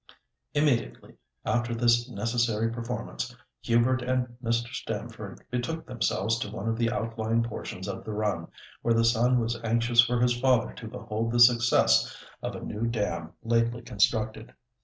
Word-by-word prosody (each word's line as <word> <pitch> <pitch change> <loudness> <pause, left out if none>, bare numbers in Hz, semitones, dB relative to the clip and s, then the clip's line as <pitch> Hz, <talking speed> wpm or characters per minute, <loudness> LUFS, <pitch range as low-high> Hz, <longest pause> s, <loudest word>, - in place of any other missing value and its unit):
Immediately 145 -6 0 0.3
after 120 -1 0
this 120 +1 +3
necessary 115 0 0
performance, 120 +1 -5 0.3
Hubert 120 +3 +2
and 125 -1 -1
Mr. 115 +2 -1
Stamford - - -6
betook 125 +7 -3
themselves 115 -1 0
to 115 - -3
one 105 0 -5
of 115 - +1
the 115 0 +1
outlying 115 -1 -1
portions 105 -4 -6
of 95 -1 -5
the - - -6
run, 105 -6 -1 0.3
where 115 -1 +2
the 115 0 +3
son 120 +2 +3
was 115 0 -2
anxious 115 +1 +4
for 120 0 0
his 120 0 +3
father 125 -2 +2
to 115 - -9
behold 115 -1 -3
the 120 - +1
success 120 0 +5 0.2
of - - -4
a - - -7
new 110 +2 -3
dam 110 -3 -2
lately 115 +1 +1
constructed. 110 +2 0
115 Hz, 155 wpm, -28 LUFS, 115-120 Hz, 0.3 s, success